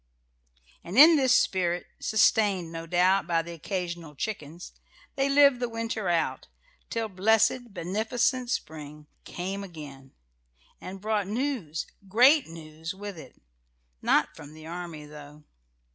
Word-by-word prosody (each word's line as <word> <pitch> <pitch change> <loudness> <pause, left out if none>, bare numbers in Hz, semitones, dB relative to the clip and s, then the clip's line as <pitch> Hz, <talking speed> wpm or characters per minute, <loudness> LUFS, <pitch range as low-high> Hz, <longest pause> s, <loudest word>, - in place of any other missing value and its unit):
And 180 +6 -6
in 315 +4 +9
this 260 -4 +4
spirit, 175 -2 0
sustained, 200 -5 +2
no 165 0 -7
doubt, 180 +1 +2
by 165 -1 +1
the 170 - -9
occasional 170 -2 -5
chickens, 170 -2 -6 0.4
they 275 0 +1
lived 280 -2 +5
the 245 -1 -2
winter 230 -4 -3
out, 165 -2 -1 0.4
till 230 -1 -2
blessed, 225 +5 +2
beneficent 225 +7 -1
spring 150 -8 -5 0.2
came 195 +3 -5
again, 145 -7 -11 0.7
and 190 +1 -8
brought 210 -2 -1
news, 220 - -2 0.2
great 255 +9 +5
news, 160 0 -8
with 205 0 -7
it. 145 -6 -13 0.6
Not - - +2
from 150 +1 -12
the 155 0 -12
army, 170 -2 -7
though. 150 0 -13
185 Hz, 130 wpm, -27 LUFS, 160-225 Hz, 0.7 s, in